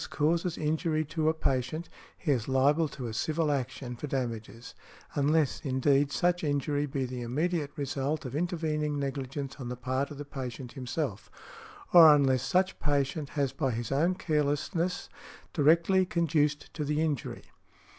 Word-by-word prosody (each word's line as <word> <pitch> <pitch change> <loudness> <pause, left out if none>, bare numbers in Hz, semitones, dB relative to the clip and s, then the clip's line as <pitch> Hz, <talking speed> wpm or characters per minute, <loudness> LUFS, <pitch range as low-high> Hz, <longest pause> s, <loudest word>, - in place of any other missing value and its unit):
causes 165 +3 0
injury 155 +1 0
to 155 +1 0
a - - +2
patient, 135 +3 -1 0.3
he 160 - -1
is 120 -5 0
liable 140 +4 +3
to 130 -3 -7
a 115 - -4
civil 155 +6 0
action 130 -2 -3
for 135 +5 -6
damages, 115 -3 -4 0.4
unless, 150 0 +2
indeed, 140 0 +2
such 175 +7 +1
injury 145 0 0
be 135 -1 -2
the 125 0 -5
immediate 150 +5 -1
result 140 0 -2
of 130 +1 -5
intervening 155 -3 -1
negligence 140 0 -4
on 125 -4 -6
the 125 - -3
part 130 +3 -2
of 150 - -9
the 145 - -6
patient 130 -3 -6
himself, 125 - -4 0.6
or 160 -4 +10
unless 135 -3 +3
such 185 +8 +1
patient 145 0 0
has 140 -3 +1
by 135 -4 0
his 115 0 -3
own 165 +7 +2
carelessness 160 +3 -1 0.5
directly 170 +5 +4
conduced 155 -4 0
to 150 - -3
the 150 +1 0
injury. 155 -5 -2
145 Hz, 155 wpm, -29 LUFS, 130-155 Hz, 0.6 s, or